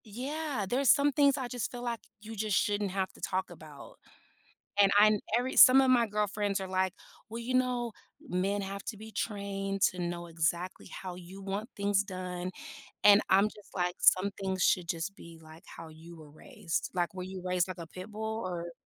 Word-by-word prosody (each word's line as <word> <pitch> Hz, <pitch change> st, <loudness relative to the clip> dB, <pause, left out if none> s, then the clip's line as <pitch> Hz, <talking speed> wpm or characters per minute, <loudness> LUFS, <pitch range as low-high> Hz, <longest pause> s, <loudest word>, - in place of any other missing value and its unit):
Yeah, 265 Hz, +2 st, -3 dB
there's 260 Hz, +5 st, +1 dB
some 290 Hz, 0 st, +5 dB
things 280 Hz, 0 st, +3 dB
I 260 Hz, -2 st, -3 dB
just 245 Hz, -1 st, -4 dB
feel, 245 Hz, -1 st, -7 dB
like, 235 Hz, -2 st, -2 dB, 0.2 s
you 220 Hz, +1 st, -9 dB
just 215 Hz, -1 st, 0 dB
shouldn't 205 Hz, -1 st, 0 dB
have 190 Hz, 0 st, -2 dB
to -, -, -17 dB
talk 190 Hz, 0 st, -2 dB
about, 155 Hz, -4 st, -12 dB, 0.8 s
and 200 Hz, -1 st, +6 dB
I 215 Hz, 0 st, +6 dB, 0.2 s
every 250 Hz, +2 st, -2 dB
some 260 Hz, +1 st, +9 dB
of 265 Hz, -, +3 dB
my 245 Hz, -2 st, +5 dB
girlfriends 205 Hz, -1 st, -1 dB
are, 190 Hz, -, -4 dB
like, 185 Hz, 0 st, 0 dB, 0.3 s
"Well, 230 Hz, +1 st, -6 dB
you 255 Hz, +2 st, -2 dB
know, 250 Hz, -2 st, +1 dB, 0.4 s
men 195 Hz, +3 st, 0 dB
have 195 Hz, 0 st, -5 dB
to 220 Hz, -, -5 dB
be 220 Hz, +2 st, -10 dB
trained 195 Hz, -2 st, -3 dB
to 180 Hz, -, -9 dB
know 175 Hz, 0 st, -3 dB
exactly 170 Hz, +2 st, -2 dB
how 185 Hz, -2 st, -7 dB
you 180 Hz, +2 st, -11 dB
want 200 Hz, +4 st, -4 dB
things 200 Hz, 0 st, +1 dB
done." 185 Hz, -2 st, -5 dB, 0.5 s
and 205 Hz, 0 st, +8 dB
I'm, 195 Hz, +2 st, +5 dB
just 210 Hz, -1 st, -8 dB
like, 180 Hz, -1 st, 0 dB
"Some 185 Hz, +2 st, +5 dB
things 190 Hz, -1 st, -2 dB
should 180 Hz, -2 st, +2 dB
just 170 Hz, +4 st, -3 dB
be, 170 Hz, -5 st, -13 dB
like, 160 Hz, +2 st, -14 dB
how 165 Hz, -, -10 dB
you 160 Hz, +2 st, -13 dB
were 155 Hz, -2 st, -13 dB
raised, 160 Hz, +2 st, -4 dB
like, 175 Hz, 0 st, -1 dB
were 185 Hz, -, -5 dB
you 190 Hz, 0 st, -7 dB
raised 180 Hz, -1 st, +1 dB
like 185 Hz, -, -6 dB
a 165 Hz, -, -7 dB
pit 185 Hz, +5 st, -10 dB
bull 220 Hz, +1 st, -4 dB
or" 175 Hz, -2 st, -4 dB
195 Hz, 200 wpm, -30 LUFS, 180-220 Hz, 0.8 s, some